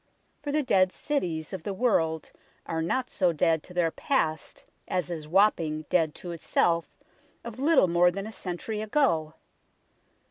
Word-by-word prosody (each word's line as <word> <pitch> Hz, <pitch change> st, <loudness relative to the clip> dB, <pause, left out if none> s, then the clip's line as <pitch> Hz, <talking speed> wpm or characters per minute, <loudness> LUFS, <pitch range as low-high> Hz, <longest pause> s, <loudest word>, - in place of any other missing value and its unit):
For 290 Hz, -, -3 dB
the 300 Hz, +1 st, +1 dB
dead 185 Hz, -7 st, +3 dB
cities 175 Hz, -, -3 dB
of 190 Hz, -, -4 dB
the 195 Hz, +3 st, -4 dB
world 165 Hz, -, +1 dB, 0.3 s
are 160 Hz, 0 st, -2 dB
not 250 Hz, +10 st, -1 dB
so 180 Hz, -3 st, +2 dB
dead 160 Hz, 0 st, +2 dB
to 180 Hz, -, -14 dB
their 170 Hz, -2 st, +2 dB
past 160 Hz, -, -2 dB, 0.2 s
as 180 Hz, -1 st, -2 dB
is 155 Hz, -3 st, -5 dB
Wapping 160 Hz, -4 st, +2 dB
dead 160 Hz, -4 st, +2 dB
to 175 Hz, -, -7 dB
itself 170 Hz, 0 st, 0 dB, 0.5 s
of 235 Hz, +1 st, -8 dB
little 285 Hz, -, +4 dB
more 175 Hz, +1 st, +4 dB
than 195 Hz, +3 st, -5 dB
a 220 Hz, -, -7 dB
century 200 Hz, +2 st, -5 dB
ago. 210 Hz, -, +1 dB
175 Hz, 155 wpm, -27 LUFS, 160-215 Hz, 0.5 s, little